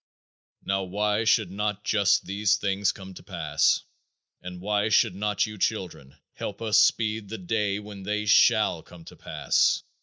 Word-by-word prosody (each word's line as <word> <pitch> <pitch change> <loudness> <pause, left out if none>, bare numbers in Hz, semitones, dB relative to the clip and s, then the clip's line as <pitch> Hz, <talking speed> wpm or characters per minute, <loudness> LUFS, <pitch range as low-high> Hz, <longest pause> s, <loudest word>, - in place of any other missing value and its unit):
Now 95 0 -1
why 105 +3 -1
should 110 -4 +2
not 105 +1 -3
just 100 -2 +2
these 100 +2 +1
things 100 -1 0
come 95 -1 -11
to - - -12
pass - - 0 0.6
and 90 0 -8
why 105 +2 0
should 105 - +3
not 105 +1 -1
you 105 -2 -9
children 90 - -3 0.2
help - - -6
us 110 -2 +2
speed 110 -2 +1
the 110 - -5
day 100 +1 -1
when 105 -1 -9
they 105 +2 -2
shall 105 - +4
come 85 -2 -15
to - - -12
pass? - - 0
105 Hz, 160 wpm, -26 LUFS, 95-105 Hz, 0.6 s, shall